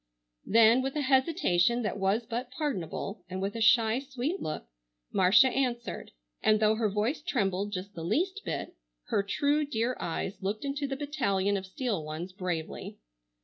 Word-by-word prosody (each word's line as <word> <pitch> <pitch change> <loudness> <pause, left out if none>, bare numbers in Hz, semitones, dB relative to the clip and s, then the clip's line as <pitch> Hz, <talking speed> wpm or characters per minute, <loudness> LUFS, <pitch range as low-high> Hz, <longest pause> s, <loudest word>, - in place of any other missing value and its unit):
Then 230 +3 +6
with 270 +2 -3
a 300 - 0
hesitation 260 - +2
that 210 -1 -2
was 200 +5 +1
but 240 +2 -4
pardonable, 250 - -4
and 185 +1 -4
with 195 +2 -2
a 230 - -3
shy 225 +1 +5
sweet 275 +6 -3
look, 155 - -4 0.5
Marcia 195 +8 +6
answered; 245 -2 -2 0.3
and 215 0 +4
though 215 0 +4
her 220 -1 +1
voice 210 +10 -1
trembled 205 - -1
just 195 +2 -5
the 165 - -7
least 365 - 0
bit, - - -4 0.3
her - - +2
true, 285 +9 +1
dear 245 -3 -1
eyes 180 +4 -3
looked 205 +6 -2
into 280 +1 -2
the 270 -1 -3
battalion 205 -10 0
of 190 -1 -4
steel 205 - -2
ones 155 +4 -5
bravely. 180 -4 -4
225 Hz, 165 wpm, -29 LUFS, 195-265 Hz, 0.5 s, Then